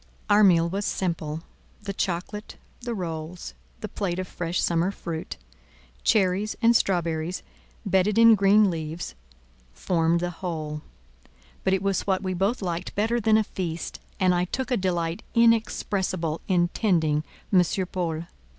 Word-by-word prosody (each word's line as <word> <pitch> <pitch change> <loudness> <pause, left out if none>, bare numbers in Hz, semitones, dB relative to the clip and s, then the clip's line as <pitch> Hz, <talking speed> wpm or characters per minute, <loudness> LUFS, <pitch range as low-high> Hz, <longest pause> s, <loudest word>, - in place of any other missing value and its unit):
Our 210 +1 +6
meal 170 -4 +5
was 195 +4 -2
simple: 165 -5 -2 0.4
the 200 -1 -4
chocolate, 195 +3 -3 0.3
the 240 -1 -3
rolls, 165 - -5 0.3
the - - -3
plate 180 -3 -3
of 185 0 -3
fresh 175 +1 -3
summer 170 +2 +2
fruit, 170 -4 -5 0.7
cherries 200 +1 +2
and 230 +1 +4
strawberries 170 -4 0 0.4
bedded 195 +1 +2
in 230 0 +8
green 200 0 +5
leaves 160 +1 -5 0.6
formed 165 - +1
the 175 0 -1
whole: 155 -4 -4 0.8
but 190 - +2
it 190 - -3
was 195 0 0
what 190 0 +1
we 185 -1 -1
both 195 +5 0
liked 175 0 -3
better 225 +4 +1
than 220 -1 +4
a 220 - +3
feast, 170 -5 -5 0.2
and 185 -1 +4
I 175 0 +1
took 260 +7 -3
a - - +4
delight 175 -3 -1
inexpressible 200 -7 +1
in 175 -2 +3
tending 160 -8 +1 0.3
M. 185 - +7 0.3
Paul. 165 -3 -2
180 Hz, 145 wpm, -26 LUFS, 170-200 Hz, 0.8 s, in